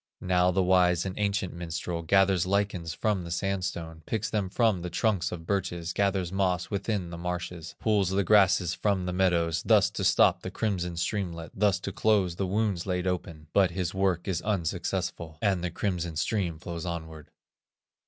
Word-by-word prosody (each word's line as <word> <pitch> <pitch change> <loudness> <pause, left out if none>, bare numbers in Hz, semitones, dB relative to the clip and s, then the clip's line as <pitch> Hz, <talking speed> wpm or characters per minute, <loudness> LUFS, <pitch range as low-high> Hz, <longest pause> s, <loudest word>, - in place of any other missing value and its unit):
Now 90 0 +2
the 95 +1 +2
wise 90 -1 +3
and 95 -1 -4
ancient 100 -3 0
minstrel 85 0 -4
Gathers 95 +1 +3
lichens 95 -4 0
from 100 +1 -1
the 85 - -7
sandstone, 85 -3 -3
Picks 110 -1 -2
them 105 -4 -1
from 110 -3 +2
the 90 - -4
trunks 100 -3 0
of 80 -2 -6
birches, 90 -3 -2
Gathers 95 -3 0
moss 95 -2 0
within 100 -3 -2
the 85 - -7
marshes, 90 -1 -5
Pulls 105 -4 +2
the 100 +1 +1
grasses 95 -3 +4
from 100 -3 0
the 90 - -2
meadows, 85 -3 +2
Thus - - +4
to - - -4
stop - - +4
the - - -5
crimson 90 -5 -2
streamlet, 85 -3 -3
Thus 100 -1 +2
to 100 - -4
close 100 -4 +1
the 95 - -1
wounds 100 -2 0
laid 90 -1 -1
open; 85 -4 -3
But 95 -3 +4
his 90 0 -3
work 95 -2 0
is 90 -4 -1
unsuccessful, 90 -4 -2
And 95 -3 +1
the 90 - 0
crimson 85 -2 -2
stream 85 0 -1
flows 85 0 -6
onward. 80 -3 -6
90 Hz, 175 wpm, -28 LUFS, 85-100 Hz, -, grasses